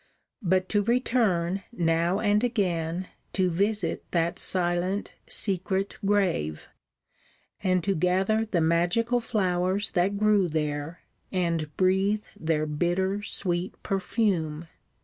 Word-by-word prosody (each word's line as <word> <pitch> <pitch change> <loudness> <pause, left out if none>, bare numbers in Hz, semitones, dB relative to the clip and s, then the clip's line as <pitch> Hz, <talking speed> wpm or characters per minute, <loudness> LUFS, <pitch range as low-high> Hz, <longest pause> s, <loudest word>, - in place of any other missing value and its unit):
But 185 -1 +1
to 205 - +2
return, 205 -6 +1
now 170 -1 +1
and 210 0 +2
again, 180 -6 -1 0.2
to 185 -2 +1
visit 200 0 0
that 170 -1 0
silent, 180 +2 0
secret 195 0 0
grave: 185 - 0 0.9
and 185 -3 +1
to 195 - +1
gather 190 +6 +2
the 180 -5 +1
magical 175 +9 +2
flowers 190 -3 0
that 190 +2 +1
grew 210 -3 +3
there, 150 0 -3 0.3
and 170 -5 -1
breathe 195 +3 +2
their 155 -1 0
bitter, 175 +6 0
sweet 180 -3 -2
perfume. 180 -5 -1
185 Hz, 110 wpm, -27 LUFS, 170-205 Hz, 0.9 s, grew